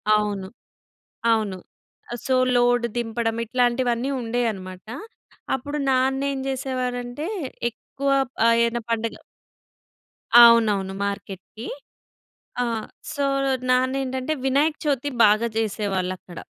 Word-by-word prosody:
అవును. 205 -2 -1 0.9
అవును. 210 -4 0 0.7
So, 260 - +2 0.2
load 245 0 +3
దింపడం, 225 -1 -1
ఇట్లాంటివన్నీ 245 +1 +1
ఉండేయన్నమాట. 220 -6 -3 0.7
అప్పుడు 285 +3 -3
నాన్నేం 265 +1 +1
జేసేవారంటే, 255 +1 -3 0.4
ఎక్కువ 275 +4 -6 0.4
ఆహ్, 230 0 +5
ఏదన 235 0 -1
పండగ 230 0 -1 1.2
అవునవును 210 -5 +5
మార్కెట్‌కి. 200 +3 -6 1.0
ఆ! - - +2 0.5
సో, 285 -2 -1 0.5
నాన్నేంటంటే, 260 +2 0
వినాయక 290 +4 +2
చవితి 285 -1 0 0.2
బాగా 215 +3 +4
జేసేవాళ్ళక్కడ. 190 -5 -2
240 Hz, 85 wpm, -24 LUFS, 215-260 Hz, 1.2 s, ఆహ్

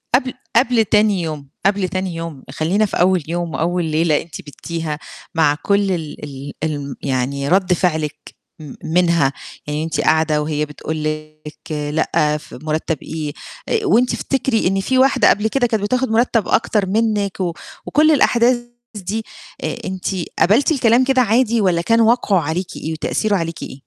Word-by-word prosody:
قبل 255 0 0 0.2
قبل 235 -2 +4
تاني 210 -3 +3
يوم، 155 -4 -5 0.2
قبل 195 -2 +2
تاني 185 -2 -3
يوم، 165 -5 -6
خلّينا 175 +9 +1
في - - -3
أول 185 -2 +3
يوم 170 -1 -3
وأول 175 +3 0
ليلة 155 -1 +2
أنتِ 165 - -9
بيتّيها 155 +1 -5 0.4
مع 150 -3 +3
كل 200 -1 +2
ال 160 -4 -3
ال 140 0 -8
الم 145 -3 -3
يعني 140 +1 -1
رد 185 0 +3
فعلِك، 160 -4 -2 0.2
م 150 -3 -9
منها، 170 -4 +2 0.3
يعني 150 +1 -2
أنتِ 160 - -1
قاعدة 155 -1 +2
وهي 150 0 -1
بتقول 155 +1 -5
لِك 155 0 -6
لأ، 150 0 0
ف - - -14
مُرتّب 155 +1 -1
إيه، 155 -2 -4 0.4
آآ 440 -2 0
وأنتِ 250 - +3
افتكري 265 -7 0
إن 195 +1 +1
في 260 +6 0
واحدة 260 0 +5
قبل 210 +2 +2
كده 245 +2 +1
كانت 220 -3 -1
بتاخد 255 +3 0
مُرتّب 230 -2 +2
أكتر 210 -3 +2
منِك، 210 -2 0
و 175 -3 -1 0.3
وكل 310 +1 +4
الأحداث 250 -4 +4 0.4
دي، 210 +3 -3 0.4
آآ - - -2
أنتِ 190 -1 -5 0.3
قبلتِ 235 - +4
الكلام 245 -4 +4
كده 260 0 +3
عادي، 235 0 +2
والّا 180 -4 +2
كان 230 +6 +3
وقعه 225 -4 +3
عليكِ 165 +4 -3
إيه 160 - -4
وتأثيرُه 205 +6 0
عليكِ 165 -1 -4
إيه؟ - - -8
180 Hz, 165 wpm, -19 LUFS, 155-220 Hz, 0.4 s, واحدة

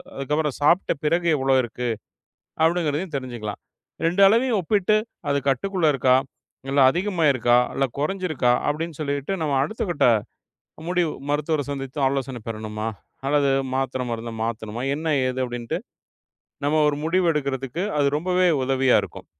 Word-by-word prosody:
அதுக்கப்புறம் 150 +1 -1
சாப்பிட்ட 170 +6 +3
பிறகு 170 +3 +1
எவ்வளோ 135 0 +1
இருக்கு 120 +1 -4 0.8
அப்டிங்கிறதையும் 165 0 0
தெரிஞ்சுக்கலாம். 120 -6 -5 0.5
2 180 +4 +2
அளவையும் 230 +3 +3
ஒப்பிட்டு 210 +3 +2 0.3
அது 140 0 +2
கட்டுக்குள்ள 180 +5 +1
இருக்கா? 130 -1 +4 0.5
இல்ல 140 0 +3
அதிகமாயிருக்கா? 150 - +2 0.2
இல்ல 135 - +1
கொறஞ்சிருக்கா? 155 -6 0 0.2
அப்டின்னு 160 +1 -3
சொல்லிட்டு 145 +3 -2
நம்ம 145 -3 0
அடுத்த 190 +10 -3
கட்ட 160 - +2 0.8
முடிவு 175 -3 +1 0.2
மருத்துவர 150 0 0
சந்தித்து 135 0 -5
ஆலோசன 130 -3 -3
பெறணுமா? 110 0 -4 0.4
அல்லது 140 -1 +3 0.2
மாத்திர, 130 -1 -1
மருந்த 115 0 -5
மாத்தணுமா? 115 +1 -4
என்ன 160 -1 0
ஏது 130 +1 -3
அப்டின்ட்டு 120 -1 -4 0.9
நம்ம 155 +2 +2
ஒரு 145 - -4
முடிவு 180 +1 +2
எடுக்குறதுக்கு 140 +3 -2
அது 140 -1 +3
ரொம்பவே 180 +1 +2 0.2
உதவியா 135 -1 +3
இருக்கும். - - -9
145 Hz, 130 wpm, -23 LUFS, 130-170 Hz, 0.9 s, இருக்கா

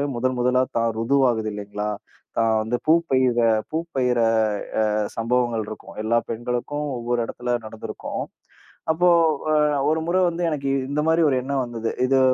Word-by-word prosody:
முதல் 130 +1 0
முதலா 125 +1 +3 0.2
தான் 115 0 +2
ருது 125 +5 +2
ஆகுது 110 -2 -1
இல்லீங்களா? 105 0 -4 0.5
தான் 115 -1 +3
வந்து 110 +3 -1
பூப்பெய்யிர 130 -7 +3 0.3
பூப்பெய்யிர 135 -7 0 0.9
அ - - -4
சம்பவங்கள் 120 -1 0
இருக்கும். 110 - -9
எல்லா 115 +2 +3
பெண்களுக்கும் 125 +6 -3
ஒவ்வொரு 120 0 -1
இடத்துல 120 +1 -3
நடந்துருக்கும். 110 0 -6 0.7
அப்போ 175 +3 +3 0.4
அ - - +3 0.4
1 160 +1 +1
முறை 180 +2 +2
வந்து 170 +1 -3
எனக்கு 140 -3 -2 0.2
இந்த 145 +1 0
மாரி 160 +1 +3
ஒரு 135 - +2
எண்ணம் 135 +1 -1
வந்தது. 115 -2 -4 0.2
இது 135 +1 +3
125 Hz, 145 wpm, -23 LUFS, 115-140 Hz, 0.9 s, முதலா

